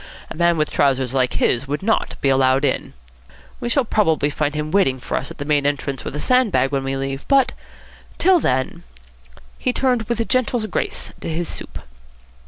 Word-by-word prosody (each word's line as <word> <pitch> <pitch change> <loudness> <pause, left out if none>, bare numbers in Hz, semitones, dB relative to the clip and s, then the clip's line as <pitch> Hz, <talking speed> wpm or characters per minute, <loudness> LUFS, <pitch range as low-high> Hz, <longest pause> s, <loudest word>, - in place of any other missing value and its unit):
A - - -5
man 170 0 +2
with 155 0 0
trousers 130 -2 +1
like 130 -2 +1
his 125 +3 +1
would 145 +6 -3
not 220 +2 0
be 140 - +2
allowed 135 +1 +3
in. - - -2 0.7
We 240 - -3
shall 260 +1 +2
probably 160 -10 +1
find 150 0 -1
him 150 0 -3
waiting 135 -10 +2
for - - -4
us 135 - -2
at - - -10
the 145 - -5
main 145 -1 +2
entrance 140 -1 -2
with - - -6
a - - -3
sand 250 +3 +3
bag, 135 -5 +2
when 135 -1 -1
we 135 0 -2
leave, 135 0 -4
but, 270 -2 +3 0.6
till 370 0 +4
then 130 - -1 0.4
" - - -30 0.3
He 250 - +1
turned 245 -4 0
with 235 -1 -1
gentle 245 -2 +1
grace - - -3
to - - -4
his 165 +1 -2
soup. - - -5
150 Hz, 200 wpm, -21 LUFS, 135-225 Hz, 0.7 s, till